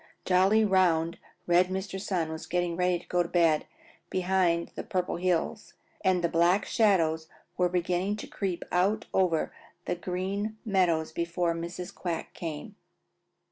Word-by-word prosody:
Jolly, 195 +4 +4
round, 170 -4 +2 0.3
red 175 +1 +4
Mr. 190 +1 -4
Sun 175 -5 -1
was 160 0 -6
getting 175 -1 0
ready 180 0 +2
to 175 - -15
go 180 - +2
to 170 - -2
bed 165 -3 +3 0.4
behind 180 -2 +1
the - - -4
Purple 180 -2 -2
Hills 180 +4 -1 0.3
and 185 -2 +2
the - - +4
Black 170 +4 +3
Shadows 165 -7 +2 0.3
were 180 0 +2
beginning 180 +3 0
to 210 - -7
creep 190 -4 -3
out 200 +5 +2
over 175 -4 +1 0.3
the - - 0
Green 190 +5 -3
Meadows 175 -6 +2
before 170 +1 -1
Mrs. 170 +2 -6
Quack 170 -3 -4
came. 165 +5 -6
180 Hz, 145 wpm, -28 LUFS, 170-190 Hz, 0.4 s, Jolly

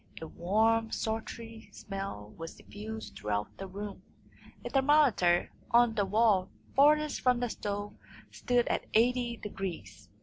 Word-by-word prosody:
A 160 - -6
warm, 220 +7 +1
sultry 225 +1 -5
smell 195 - -6
was 165 0 -8
diffused 220 +2 -8
throughout 105 0 -3
the 195 - -5
room. 200 +1 -7 0.6
A - - -2
thermometer 265 - +4 0.2
on 235 -1 +5
the 205 -3 +1
wall 205 -2 +3 0.3
farthest 300 +2 +4
from 250 -1 +3
the 245 -2 -1
stove 205 0 -4 0.4
stood 245 -1 +1
at - - -1
eighty 240 +1 +2
degrees. 160 - -7
220 Hz, 130 wpm, -31 LUFS, 190-240 Hz, 0.6 s, on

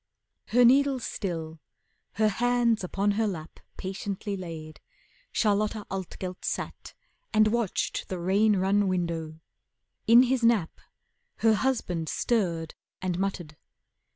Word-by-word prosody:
Her 245 +1 +4
needles 270 0 +4
still, 165 -4 -4 0.5
her 215 +1 +2
hands 240 -1 +1
upon 195 +3 0
her 220 +2 +1
lap 165 -5 -6 0.2
Patiently 195 +1 -4
laid, 160 -4 -8 0.5
Charlotta 210 0 +1
Altgelt 185 -1 -5
sat - - -4 0.4
And 215 0 +5
watched 230 -3 -1
the 185 - -3
rain 200 +5 +3
run 195 +2 +2
window. 165 -3 -2 0.7
In 235 +2 +8
his 260 0 +1
nap 230 -8 +2 0.6
Her 220 - +7
husband 205 -9 -1
stirred 170 -9 0 0.3
and 185 -1 -2
muttered. 175 -6 -3
195 Hz, 115 wpm, -27 LUFS, 175-225 Hz, 0.7 s, In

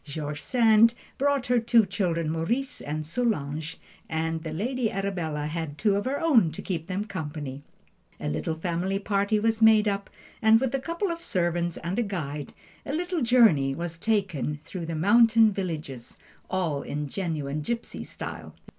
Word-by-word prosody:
George 150 0 -5
Sand 230 -1 +5 0.2
brought 280 -2 +2
her 245 -1 +3
two 230 -1 +4
children, 175 -5 -1
Maurice 230 +12 -1
and 155 +1 -4
Solange, 160 - -2 0.3
and 160 0 -1
the 160 -1 -5
"Lady 235 +7 -1
Arabella" 175 -7 -2
had 155 -1 -4
two 210 +2 +2
of 205 - -1
her 275 +2 -1
own 265 - +4
to - - -6
keep 165 -3 -3
them 195 +2 -2
company. 150 -8 -5 0.6
A - - -4
little 80 - -2
family 175 +4 -1
party 200 +1 +1
was 225 +1 0
made 220 -1 +6
up, 200 -1 -1 0.3
and 220 0 +6
with 265 0 -1
a 270 - +1
couple 340 +7 -2
of 335 0 -5
servants 175 - -1
and 180 +6 -3
a - - +4
guide, 150 - -4 0.3
a 275 - -5
little 350 +1 -1
journey 220 - +4
was 170 0 -5
taken 185 - 0
through 175 -4 -6
the 165 - -3
mountain 220 +5 +5
villages, 155 - -5 0.3
all 165 -7 -1
in 150 0 -4
genuine 155 -4 -3
gipsy 235 +9 -4
style. - - -8
185 Hz, 165 wpm, -27 LUFS, 155-225 Hz, 0.6 s, made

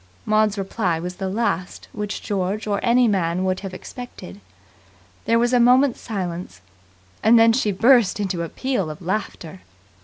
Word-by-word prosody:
Maud's 215 -1 +2
reply 190 -3 -1
was 180 +2 -6
the 190 -1 -3
last 200 -3 -2
which 210 0 -5
George 200 +2 -2
or 205 -2 -1
any 245 +1 +3
man 180 -3 0
would 185 0 0
have 195 -2 -7
expected. 185 - -10 0.8
There 230 - +3
was 240 +2 +1
a 245 - +5
moment's 250 +2 +4
silence, 180 - -5 0.6
and 225 +2 +5
then 225 0 +6
she 225 -4 +1
burst 225 +1 +4
into 190 -4 -2
a 165 - -4
peal 250 -11 -2
of 155 - -8
laughter. 180 - -4
205 Hz, 160 wpm, -22 LUFS, 185-230 Hz, 0.8 s, then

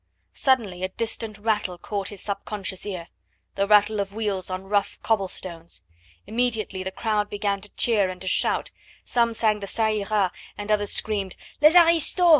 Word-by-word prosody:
Suddenly 225 -10 +1
a 185 - -1
distant 225 0 -4
rattle 210 -4 0
caught 200 +2 -3
his 205 -3 -8
subconscious 200 -1 -4
ear: 180 -4 -5 0.4
the 200 0 0
rattle 210 0 +5
of 200 0 -3
wheels 205 -5 -2
on 185 0 -4
rough 200 +1 0
cobble 210 -4 +2
stones. 170 -2 -4 0.4
Immediately 225 -5 -1
the 190 - -3
crowd 210 +1 -1
began 200 -1 -1
to 205 - -9
cheer 210 -5 +3
and 185 0 -7
to 190 - -5
shout; - - +2 0.3
some 235 -1 +2
sang 215 -2 +2
the 200 - -6
"Ca 225 +3 +1
ira!" 210 -3 +1 0.3
and 205 +1 -4
others 205 -1 +2
screamed: 200 -4 -1 0.3
"Les 305 +3 +7
aristos! 340 +1 +5
205 Hz, 170 wpm, -25 LUFS, 195-220 Hz, 0.4 s, Les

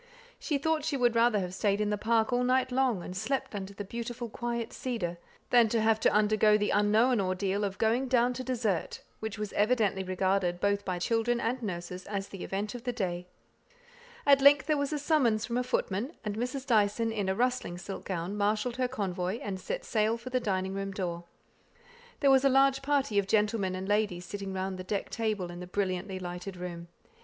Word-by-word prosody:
She 295 - -1
thought 315 +1 0
she 300 -2 -1
would 240 -2 +3
rather 230 -2 +4
have 180 -1 -4
stayed 200 +1 +1
in 210 0 0
the - - +2
park 225 +2 +1
all 245 0 +2
night 255 +1 +2
long, 250 -8 +1
and 180 - -7
slept 235 +8 -2
under 195 -1 -5
the 200 0 -7
beautiful 235 +2 -5
quiet 235 +1 -3
cedar, 180 -9 -3 0.3
than 235 -2 +6
have 220 -1 +2
to - - +3
undergo 210 0 +4
the 210 0 0
unknown 215 +3 +3
ordeal 190 +2 -1
of 195 -1 -2
"going 235 +4 +1
down 250 -1 +3
to 255 +1 -5
dessert," 225 -9 -2 0.2
which 220 0 -5
was 210 -1 -4
evidently 210 -3 +2
regarded 185 -1 0
both 200 +1 +1
by 185 -2 -2
children 230 +5 +1
and 240 +2 -1
nurses 180 -3 -5
as 200 -1 -3
the 195 - -7
event 205 +2 -3
of 245 -1 -8
the 245 - -1
day. 180 -6 -3 1.0
At 280 -1 +6
length 280 0 +7
there 310 - +2
was 285 0 -1
a 300 - 0
summons 270 -8 +2
from 235 - -4
a - - 0
footman, 245 - -1
and 205 -1 -2
Mrs. 250 +4 -3
Dyson, 225 -1 +2
in 205 -3 -1
a 190 - +1
rustling 250 -6 0
silk 195 +2 -7
gown, 180 +1 -3
marshalled 210 +4 0
her 255 -1 +1
convoy, 190 -5 -2
and 195 -2 -4
set - - -4
sail 220 0 +1
for 245 +2 -9
the 255 - +2
dining 190 -4 -1
room 195 0 -3
door. 175 -3 -4 1.0
There 280 -2 +5
was 265 0 +5
a 275 - +5
large 270 0 +4
party 275 -6 +1
of 195 - -1
gentlemen 210 -3 +1
and 185 +1 -5
ladies 205 -4 0
sitting 200 0 -5
round 190 0 -3
the - - -4
decked 200 +2 -3
table, 215 -6 -2
in 175 - -8
the 180 - -7
brilliantly 190 0 -2
lighted 180 +1 -6
room. 175 -1 -6
210 Hz, 205 wpm, -30 LUFS, 190-245 Hz, 1.0 s, length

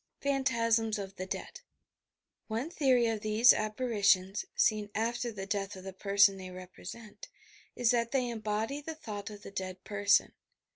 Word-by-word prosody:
PHANTASMS 230 -5 +1
OP 195 -1 -6
THE 185 0 -5
DEAD - - -6 0.9
One 235 +9 -3
theory 260 -7 +3
of 225 -2 -1
these 215 +3 +6
apparitions 210 -4 +1
(seen 210 -1 +2
after 235 +2 -1
the 195 -3 -6
death 200 -1 -2
of 185 - -10
the 190 0 -7
person 200 0 +4
they 185 -1 -8
represent) 195 - -10 0.5
is 240 -2 +3
that 235 -1 +1
they 255 -1 0
embody 220 +4 -2
the 320 +2 -6
thought 210 -8 -6
of 205 -1 -11
the - - -9
dead 185 -1 -5
person. 205 -1 +2
215 Hz, 155 wpm, -31 LUFS, 200-235 Hz, 0.9 s, these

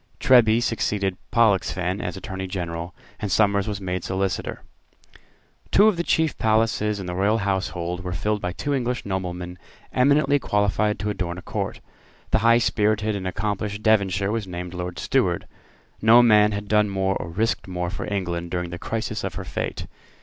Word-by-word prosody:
Treby 120 -2 +5
succeeded 100 -4 0 0.2
Pollexfen 100 -4 +2
as 90 - -4
Attorney 95 0 -5
General; 85 -2 -5 0.2
and 105 - -3
Somers 100 -1 +3
was 105 -2 -3
made 90 -2 -3
Solicitor. 95 0 -2 1.1
Two 205 - +6
of 215 - +3
the 170 - -1
chief 160 -2 +1
places 110 -1 +1
in 95 - -5
the 90 - -4
Royal 100 +4 +2
household 90 -3 -2
were 90 - -4
filled 105 +4 -1
by 90 - -2
two 145 +10 -3
English 125 -2 -1
noblemen 90 -2 -4 0.3
eminently 140 +2 +3
qualified 105 -2 +1
to 105 0 -2
adorn 90 -3 -3
a 90 - -9
court. - - -4 0.5
The - - +3
high 115 +2 +5
spirited 110 -2 +1
and 95 -2 -4
accomplished 105 +2 -3
Devonshire 100 -3 +2
was 110 -3 -2
named 90 0 -6
Lord 90 0 -5
Steward. - - 0 0.6
No 115 +3 +7
man 105 -2 +5
had 105 0 -4
done 105 0 +3
more 95 0 0
or 80 - -6
risked 110 +7 -1
more 90 -1 -3
for 100 - -5
England 85 -3 -2
during 90 -1 -3
the 85 - -6
crisis 115 +2 -3
of - - -4
her - - -5
fate. - - -4
100 Hz, 170 wpm, -24 LUFS, 90-110 Hz, 1.1 s, No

